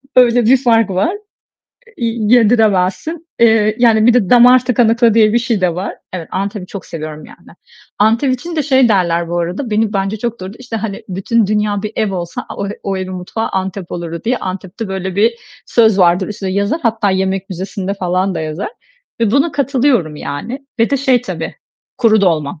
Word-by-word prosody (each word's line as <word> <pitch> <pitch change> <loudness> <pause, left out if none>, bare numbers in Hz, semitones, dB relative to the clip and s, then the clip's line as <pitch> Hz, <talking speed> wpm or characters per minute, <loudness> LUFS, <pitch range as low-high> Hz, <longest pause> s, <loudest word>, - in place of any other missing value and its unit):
Öyle 245 -2 +5
bir 260 +4 +5
fark 225 -4 +3
var. 255 - 0 0.8
İ 275 - -4 0.3
yediremezsin. 220 - +2
Eee, 220 -2 +4
yani, 225 -2 +4
bir 240 - +5
de 225 -7 +2
damar 250 +1 +6
tıkanıklığı 235 -2 +3
diye 215 -2 +4
bir 235 - +3
şey 230 -3 -1
de 180 -2 +1
var. 185 +3 -4 0.2
Evet, 175 -3 -6
Antep'i 195 0 -4
çok 195 +1 -9
seviyorum 155 -1 -7
yani. - - -17 0.4
Antep 230 +6 +3
için 335 +7 -7
de 305 - +1
şey 265 -3 +3
derler 170 -5 +1
bu 175 +1 -2
arada, 180 +9 -3
beni 215 0 +1
bence 195 +1 -1
çok 235 0 -4
doğru. 185 +1 -7
İşte, 245 -3 -6
hani, 210 -2 -5
"Bütün 195 +4 0
dünya 210 -1 0
bir 215 - -4
ev 210 -3 0
olsa 175 -2 -5
a - - -8
o 200 - -3
o 195 -1 -2
evin 185 0 -5
mutfağı 185 +5 -4
Antep 190 -1 -4
olurdu." 170 -1 -5
diye. 245 +3 +1
Antep'te 190 +3 -6
böyle 190 -1 -4
bir 225 +3 +3 0.3
söz 220 -4 +3
vardır, 180 +1 +3
üstüne 200 -2 -4
yazar. 200 - -1
Hatta 225 -4 +1
yemek 190 +1 -1
müzesi'nde 190 +1 -4
falan 185 0 -1
da - - -3
yazar 155 - -4 0.5
ve 225 -3 +2
buna 280 +6 +2
katılıyorum 260 - +1
yani. 235 - -6
Ve 230 - +2
de 280 - +2
şey 255 -3 +2
tabii, - - -5 0.4
kuru 220 -3 +4
dolma. 155 -6 0
210 Hz, 190 wpm, -16 LUFS, 185-235 Hz, 0.8 s, damar